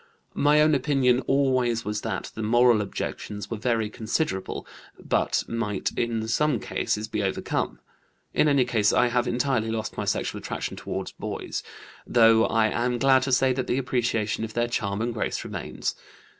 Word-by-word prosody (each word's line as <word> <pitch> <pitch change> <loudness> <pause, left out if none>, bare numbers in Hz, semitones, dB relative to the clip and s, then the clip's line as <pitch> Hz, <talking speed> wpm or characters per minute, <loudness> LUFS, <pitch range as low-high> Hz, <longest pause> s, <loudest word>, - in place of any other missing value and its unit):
My 150 +1 +4
own 155 0 +4
opinion 135 -3 +3
always 130 -4 +2
was 105 0 -2
that - - -4
the 110 - -6
moral 120 0 +4
objections 105 +1 -5
were 115 - -2
very 115 -1 0
considerable, 110 - -2 0.3
but - - 0
might 105 -4 -2
in 115 -2 -1
some 145 +2 +1
cases 105 +1 -2
be 105 -1 -2
overcome. 95 -1 -2 0.6
In - - +3
any 140 -3 +4
case 110 -4 +2
I 125 - +3
have 120 +1 +1
entirely 120 -2 0
lost 110 -1 -3
my - - -2
sexual - - -1
attraction - - -4
toward - - -5
boys; - - -4 0.5
though 115 -1 +5
I 110 -1 +2
am 120 +2 0
glad 135 +1 +4
to 130 +1 -2
say 130 0 +4
that 130 0 -3
the 125 - 0
appreciation 120 -5 0
of 110 -1 -6
their 120 0 +1
charm 105 -3 -2
and 120 0 -2
grace 110 - -2
remains. - - -4
120 Hz, 170 wpm, -26 LUFS, 110-130 Hz, 0.6 s, though